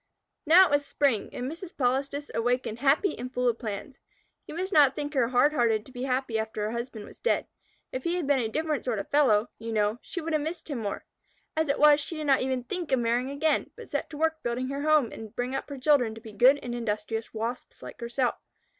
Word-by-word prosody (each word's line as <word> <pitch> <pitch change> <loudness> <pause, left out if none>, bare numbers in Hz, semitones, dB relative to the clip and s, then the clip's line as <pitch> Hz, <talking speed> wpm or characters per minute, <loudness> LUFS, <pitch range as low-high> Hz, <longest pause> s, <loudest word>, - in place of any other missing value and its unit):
Now 360 +4 +8
it - - -3
was 285 0 +3
spring, 275 -6 0
and 245 - -5
Mrs. 335 +6 -7
Polistes 275 +3 -1
awakened 240 -1 0
happy 285 +7 +3
and 250 +1 -5
full 250 -1 0
of 230 -1 +1
plans. 220 +4 -6 0.5
You - - -7
must 375 +3 -3
not 280 -3 +6
think 290 0 -4
her 260 -4 +2
hard 260 +5 +3
hearted 225 -6 +2
to - - -14
be 250 -1 -7
happy 255 -3 0
after 220 -1 -3
her 210 - -1
husband 235 -2 -5
was - - -15
dead. - - +1 0.5
If 255 - -4
he 340 +1 0
had 355 -4 -1
been 280 -1 +3
a 225 -3 -1
different 310 +3 -1
sort 240 -4 -1
of 200 - -3
a - - -34
fellow, 245 -7 +3
you 225 +1 -5
know, 215 +1 +1
she - - -6
would 325 -1 -3
have 305 - +2
missed 320 +1 -5
him 270 - -2
more. 205 -3 -4 0.5
As 315 -1 0
it 280 - +2
was, 295 0 +6
she 315 +2 -5
did 305 - -4
not 275 -2 +4
even 255 -1 -1
think 345 +4 -4
of 265 - +4
marrying 240 +2 0
again, 290 +3 +1
but - - -11
set - - -2
to 300 - -8
work 320 +1 +1
to - - -45
build 255 +1 -3
her 280 +1 -3
home 305 -5 +3
and 220 -2 -9
bring 245 +2 -2
up 270 - -3
her 280 - -6
children 255 -5 +3
to 225 - -11
be 220 -1 -10
good 255 +7 +6
and 245 - -4
industrious 225 -1 -3
Wasps 230 +3 -5
like - - -10
herself. 240 +2 -1
260 Hz, 250 wpm, -28 LUFS, 235-295 Hz, 0.5 s, Now